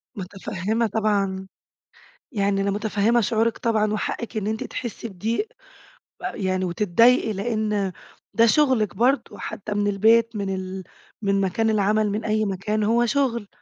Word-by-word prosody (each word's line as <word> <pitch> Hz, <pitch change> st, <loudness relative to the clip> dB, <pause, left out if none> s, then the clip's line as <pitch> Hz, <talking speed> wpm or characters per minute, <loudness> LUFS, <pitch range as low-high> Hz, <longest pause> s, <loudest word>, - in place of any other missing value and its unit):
مُتفهّمة 200 Hz, +3 st, -2 dB
طبعًا. 200 Hz, -3 st, 0 dB, 0.8 s
يعني 200 Hz, -3 st, +1 dB
أنا 200 Hz, 0 st, 0 dB
مُتفهّمة 215 Hz, +3 st, +1 dB
شعورِك 225 Hz, +2 st, +1 dB
طبعًا، 215 Hz, -2 st, +1 dB
وحقِك 225 Hz, +2 st, -3 dB
إن 205 Hz, -, -2 dB
أنتِ 220 Hz, 0 st, -2 dB
تحسّي 235 Hz, -1 st, -5 dB
بضيق، 225 Hz, -, -2 dB, 0.7 s
ويعني 185 Hz, -2 st, -1 dB
وتتضايقي، 215 Hz, +6 st, +3 dB
لإن 210 Hz, -1 st, -1 dB, 0.4 s
ده 230 Hz, 0 st, +5 dB
شُغلِك 235 Hz, -7 st, +3 dB
برضه 255 Hz, +6 st, +1 dB
حتّى 210 Hz, +1 st, -5 dB
من 205 Hz, 0 st, 0 dB
البيت، 225 Hz, +3 st, +3 dB
من 195 Hz, -2 st, -2 dB
ال 185 Hz, 0 st, -5 dB, 0.4 s
من 195 Hz, -1 st, +1 dB
مكان 210 Hz, +4 st, +1 dB
العمل، 215 Hz, 0 st, +2 dB
من 210 Hz, +2 st, -3 dB
أي 215 Hz, 0 st, +1 dB
مكان، 205 Hz, +2 st, -1 dB
هو 235 Hz, +3 st, +3 dB
شغل. 235 Hz, -4 st, 0 dB
215 Hz, 135 wpm, -23 LUFS, 195-225 Hz, 0.8 s, ده